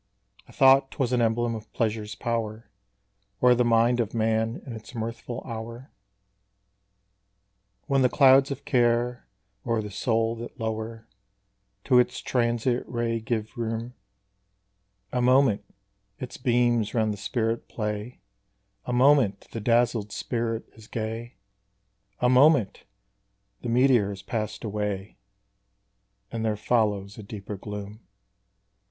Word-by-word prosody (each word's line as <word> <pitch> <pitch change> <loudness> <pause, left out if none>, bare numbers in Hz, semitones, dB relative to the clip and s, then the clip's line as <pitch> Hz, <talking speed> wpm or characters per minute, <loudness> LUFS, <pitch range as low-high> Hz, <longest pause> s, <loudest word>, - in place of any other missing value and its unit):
I - - -16
thought 135 0 +5
'twas 130 -2 -2
an 125 - +2
emblem 115 +1 +1
of 110 -1 -8
pleasure's 110 -1 -2
power 115 -2 -3 0.7
O'er 125 0 +7
the 125 0 +2
mind 120 +1 +3
of 115 -1 -1
man 110 +1 0
in 125 - -7
its 110 +2 -10
mirthful 115 +1 -5
hour, 115 +3 -7 1.9
When 135 -1 +2
the 125 - +4
clouds 135 0 +6
of 140 0 -6
care 120 -1 +1 0.4
o'er 115 -1 0
the 105 -1 -5
soul 115 +2 0
that 120 +2 -9
lower 110 0 -4 0.8
To 125 -2 +5
its 125 - +1
transient 120 0 0
ray 120 -1 -1
give 110 +1 -3
room: 115 0 -3 1.2
A 125 - 0
moment, 125 -4 +4 0.5
its 125 - -7
beams 120 -3 +1
round 110 -2 +2
the - - -8
spirit 115 +2 -2
play; 105 +2 -4 0.6
A 125 - -3
moment, 125 -5 +3
the 115 - -5
dazzled 115 -2 +2
spirit 115 -2 -3
is 110 -1 -15
gay; 115 +2 -5 0.9
A 125 - +4
moment! 130 -3 +4 0.8
the 120 - -4
meteor 120 -4 +4
has 100 -1 -7
passed 110 -3 -4
away, 105 -2 -4 1.1
And 115 -1 -3
there 110 -2 0
follows 105 -3 0
a - - -6
deeper 100 0 -7
gloom. 105 +1 -7
115 Hz, 125 wpm, -26 LUFS, 110-125 Hz, 1.9 s, O'er